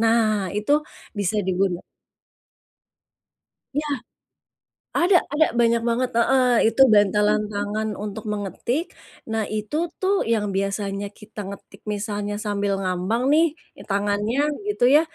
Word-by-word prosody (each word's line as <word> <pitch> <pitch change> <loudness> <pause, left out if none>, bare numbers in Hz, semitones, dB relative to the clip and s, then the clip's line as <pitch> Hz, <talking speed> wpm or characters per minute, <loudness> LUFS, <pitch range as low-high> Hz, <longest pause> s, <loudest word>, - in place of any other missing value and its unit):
nah, 220 -3 +2
itu 210 +7 0 0.4
bisa 205 -1 -1
diguna 185 -1 0 1.9
Iya, 300 +1 -1 1.1
ada 360 +2 +5 0.2
ada 310 +2 +4
banyak 235 0 +3
banget, 245 +2 +1
heeh, 255 +2 +4 0.2
itu 230 +4 -2
bantalan 210 +1 +4
tangan 205 +2 -2 0.2
untuk 210 +1 -6
mengetik, 210 - -2 0.5
nah, 220 -1 0
itu 215 +6 -3 0.2
tuh 385 +1 +2 0.2
yang 215 -2 +1
biasanya 195 0 -2
kita 210 -1 -10
ngetik 200 0 -11
misalnya 205 0 -3
sambil 205 -1 0
ngambang 185 +5 -1
nih 320 +2 +6 0.4
tangannya 205 +4 0 0.3
gitu 410 -12 +1
ya, - - +7
210 Hz, 115 wpm, -23 LUFS, 200-235 Hz, 1.9 s, ya